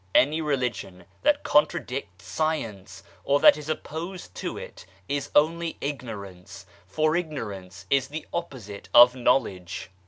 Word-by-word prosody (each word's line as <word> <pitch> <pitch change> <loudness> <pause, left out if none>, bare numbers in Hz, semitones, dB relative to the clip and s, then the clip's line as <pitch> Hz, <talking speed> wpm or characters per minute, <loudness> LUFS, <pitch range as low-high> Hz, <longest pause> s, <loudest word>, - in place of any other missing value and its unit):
Any 155 +4 +4
religion 125 - -2 0.2
that 295 0 +2
contradicts 125 -9 0
Science 105 -9 -3 0.2
or 140 +1 +2
that - - +8
is 150 0 -8
opposed 160 - -5
to - - -4
it, - - -10 0.2
is 145 0 -2
only 165 +2 +2
ignorance 100 -9 -7 0.2
for 155 - +1
Ignorance 105 - -5
is 135 -2 +3
the 155 +2 -6
opposite 120 - -6
of 120 +1 +9
Knowledge. 100 -9 0
135 Hz, 125 wpm, -26 LUFS, 100-155 Hz, 0.2 s, of